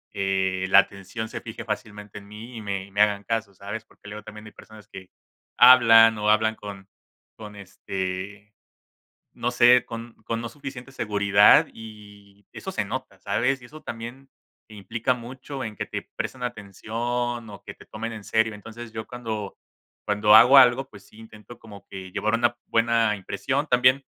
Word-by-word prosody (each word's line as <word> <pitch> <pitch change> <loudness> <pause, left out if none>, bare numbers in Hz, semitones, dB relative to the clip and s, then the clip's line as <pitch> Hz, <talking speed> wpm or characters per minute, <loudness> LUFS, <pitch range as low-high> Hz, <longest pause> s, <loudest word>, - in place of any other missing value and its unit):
eh, 95 -1 -1
la 95 - +6
atención 100 +3 -3
se - - -7
fije 110 0 -8
fácilmente 105 -1 -6
en 100 - -16
mí 110 +4 -11
y - - -6
me 100 -2 -4
y 100 - -19
me 100 +2 +1
hagan 105 -1 +2
caso, 110 -2 -3
¿sabes? 100 +3 -7
Porque, - - -19
luego 105 +1 -8
también 105 0 -11
hay 110 - -11
personas 105 -1 -15
que 95 -1 -12 0.5
hablan, 115 -3 +8
o 105 0 0
hablan 110 +1 +3
con 100 -2 -10 0.5
con 105 -1 -11
este, 95 +1 -6 0.8
no 120 - -2
sé, 125 0 +5
con 115 0 -8
con 115 0 -3
no 120 - -5
suficiente 135 -1 -9
seguridad 100 -4 +4
y 105 -2 -14
eso - - -7
se - - -2
nota, - - -6
¿sabes? 135 +2 -1
Y - - -13
eso 155 +5 -13
también 120 +4 -8 0.4
implica 110 +4 -2
mucho 130 +3 -7
en 110 -1 -7
que - - -3
te - - -7
presten 130 - -5
atención 120 +1 -4
o 100 - -12
que - - -8
te - - -17
tomen 115 +2 -6
en 110 -2 -9
serio, 110 +1 +1
entonces, 115 +2 -10
yo 110 0 -6
cuando 110 -5 -6 0.5
cuando 105 0 +4
hago 130 +5 +8
algo, 130 +1 +5
pues, 100 - -15
sí, - - -21
intento 110 +1 -14
como 105 -3 -14
que 95 -1 -9
llevar 110 +1 -1
una 120 +1 +1
buena 115 -2 +2
impresión, 135 +9 -3
también 125 +1 +3
110 Hz, 175 wpm, -24 LUFS, 100-120 Hz, 0.8 s, hablan